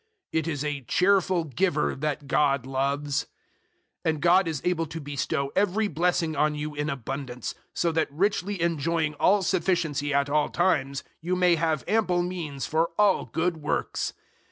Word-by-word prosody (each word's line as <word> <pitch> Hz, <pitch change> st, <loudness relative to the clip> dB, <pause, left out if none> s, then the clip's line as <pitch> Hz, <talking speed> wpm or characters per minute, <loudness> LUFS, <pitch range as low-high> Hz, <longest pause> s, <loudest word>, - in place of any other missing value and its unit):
"It 160 Hz, 0 st, 0 dB
is 145 Hz, -3 st, -2 dB
a 145 Hz, -2 st, -2 dB
cheerful 185 Hz, -, +2 dB
giver 155 Hz, +2 st, 0 dB
that 145 Hz, 0 st, -3 dB
God 140 Hz, -2 st, +2 dB
loves." 140 Hz, +2 st, -1 dB, 0.8 s
009:008 -, -, +1 dB
And 155 Hz, -2 st, -1 dB
God 180 Hz, +1 st, +5 dB
is 160 Hz, -3 st, -2 dB
able 170 Hz, -2 st, +1 dB
to 165 Hz, +2 st, -6 dB
bestow 140 Hz, 0 st, -2 dB
every 205 Hz, +2 st, +2 dB
blessing 165 Hz, -1 st, 0 dB
on 150 Hz, +1 st, +2 dB
you 150 Hz, 0 st, -4 dB
in 145 Hz, +1 st, -2 dB
abundance, 130 Hz, -2 st, -4 dB, 0.2 s
so 170 Hz, -, +1 dB
that 160 Hz, -2 st, 0 dB
richly 200 Hz, +4 st, 0 dB
enjoying 165 Hz, -1 st, 0 dB
all 200 Hz, +1 st, +4 dB
sufficiency 165 Hz, -6 st, 0 dB
at 140 Hz, 0 st, +2 dB
all 150 Hz, +1 st, +1 dB
times, 140 Hz, -6 st, +1 dB, 0.2 s
you 180 Hz, +3 st, -1 dB
may 180 Hz, -1 st, +4 dB
have 160 Hz, -4 st, 0 dB
ample 185 Hz, -4 st, +2 dB
means 165 Hz, -6 st, -4 dB
for 160 Hz, +2 st, +1 dB
all 205 Hz, -2 st, +3 dB
good 165 Hz, +7 st, -1 dB
works. 150 Hz, -1 st, -2 dB
160 Hz, 160 wpm, -26 LUFS, 145-180 Hz, 0.8 s, God